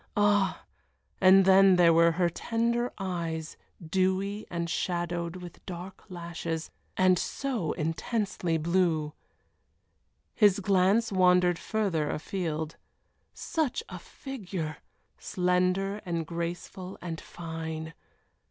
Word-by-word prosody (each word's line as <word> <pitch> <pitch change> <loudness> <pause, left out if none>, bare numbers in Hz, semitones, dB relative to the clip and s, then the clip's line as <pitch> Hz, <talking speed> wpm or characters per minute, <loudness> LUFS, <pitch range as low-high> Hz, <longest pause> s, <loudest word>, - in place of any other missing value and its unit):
Ah! 205 -1 +2 0.6
and 190 0 +7
then 190 0 +7
there 170 -2 +6
were 165 0 +5
her 175 +1 +2
tender 235 +6 -1
eyes, 170 -4 -3 0.3
dewy 190 +4 0
and 170 -1 -2
shadowed 175 0 -2
with 180 -2 -10
dark 185 +1 -8
lashes, 170 -2 -5 0.3
and 185 -1 +4
so 245 - -2
intensely 170 +1 -1
blue. 160 -2 +1 1.2
His 205 -3 +4
glance 200 +3 +3
wandered 180 -2 +4
farther 190 -9 -1
afield. 160 -2 -3 0.6
Such 315 - -1
a - - -7
figure! 185 - -6 0.4
slender 185 +3 0
and 170 -2 -2
graceful 175 +3 -5
and 170 -2 -5
fine. 160 -1 -6
180 Hz, 100 wpm, -29 LUFS, 165-195 Hz, 1.2 s, and